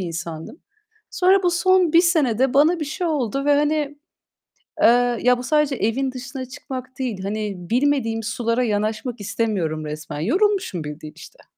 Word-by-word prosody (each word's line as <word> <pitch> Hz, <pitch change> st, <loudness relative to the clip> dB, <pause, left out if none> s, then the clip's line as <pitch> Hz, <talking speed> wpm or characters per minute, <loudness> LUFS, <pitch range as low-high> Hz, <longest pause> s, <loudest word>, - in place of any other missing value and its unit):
insandım. 170 Hz, -, -6 dB, 0.5 s
Sonra 380 Hz, +1 st, +3 dB
bu 355 Hz, -, +3 dB
son 365 Hz, -1 st, +3 dB
1 335 Hz, -, +7 dB
senede 270 Hz, -, +2 dB
bana 315 Hz, +5 st, +4 dB
bir -, -, -1 dB
şey 305 Hz, +4 st, -3 dB
oldu 275 Hz, -4 st, -1 dB
ve 290 Hz, 0 st, +4 dB
hani, 295 Hz, 0 st, 0 dB, 0.8 s
eee, 245 Hz, 0 st, +4 dB
ya 250 Hz, 0 st, +4 dB
bu -, -, -5 dB
sadece 300 Hz, +1 st, +1 dB
evin 255 Hz, +4 st, -1 dB
dışına 255 Hz, +1 st, -6 dB
çıkmak 255 Hz, -1 st, -8 dB
değil, 235 Hz, -8 st, -3 dB
hani, 210 Hz, +1 st, -3 dB, 0.2 s
bilmediğim 250 Hz, -3 st, +1 dB
sulara 230 Hz, +2 st, -1 dB
yanaşmak 220 Hz, +2 st, -2 dB
istemiyorum 185 Hz, -8 st, -2 dB
resmen. 150 Hz, 0 st, -6 dB
Yorulmuşum 375 Hz, -, 0 dB
bildiğin 150 Hz, +1 st, -8 dB
işte. -, -, -14 dB
250 Hz, 150 wpm, -22 LUFS, 215-295 Hz, 0.8 s, 1